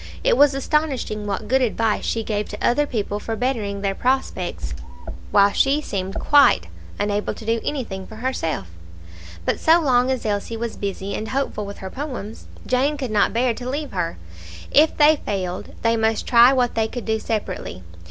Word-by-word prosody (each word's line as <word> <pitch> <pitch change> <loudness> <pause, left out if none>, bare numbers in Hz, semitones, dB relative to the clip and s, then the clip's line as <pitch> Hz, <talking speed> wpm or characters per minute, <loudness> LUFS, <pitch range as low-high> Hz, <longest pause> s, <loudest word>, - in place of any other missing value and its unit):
It - - +4
was 290 -6 +5
astonishing 270 -7 -1
what 205 +1 -3
good 265 +1 +3
advice 225 -3 0
she 225 - -1
gave 210 -1 -2
to 210 - -2
other 290 +4 +2
people 210 -4 -2
for 225 +1 -4
bettering 220 -5 -2
their 195 -1 0
prospects, 190 - -2 0.6
while 200 0 +5
she 275 +2 +3
seemed 195 -9 -4
quite 290 -1 +5 0.3
unable 205 0 -1
to 220 - -10
do 225 0 0
anything 210 -10 -4
for 220 - -11
herself. 215 - -2 0.8
But - - 0
so 325 +2 +5
long 255 -5 +3
as 260 -3 -1
Elsie 210 +2 -2
was 235 0 -4
busy 200 0 -4
and 220 - -4
hopeful 260 -6 -2
with 200 - -8
her 190 - -6
poems, 255 -7 -6 0.2
Jane 275 +4 +1
could 260 -5 -4
not 210 -1 +3
bear 240 +1 +1
to 245 +2 -6
leave 290 +2 -3
her; 170 - -2 0.5
if 310 +2 +4
they 300 +1 +6
failed, 185 -3 -3
they 230 0 +3
must 220 -1 0
try 240 +1 +7
what 250 -3 +1
they 220 -1 +1
could 240 +1 -6
do 220 0 0
separately. 195 - -4
225 Hz, 180 wpm, -22 LUFS, 205-265 Hz, 0.8 s, try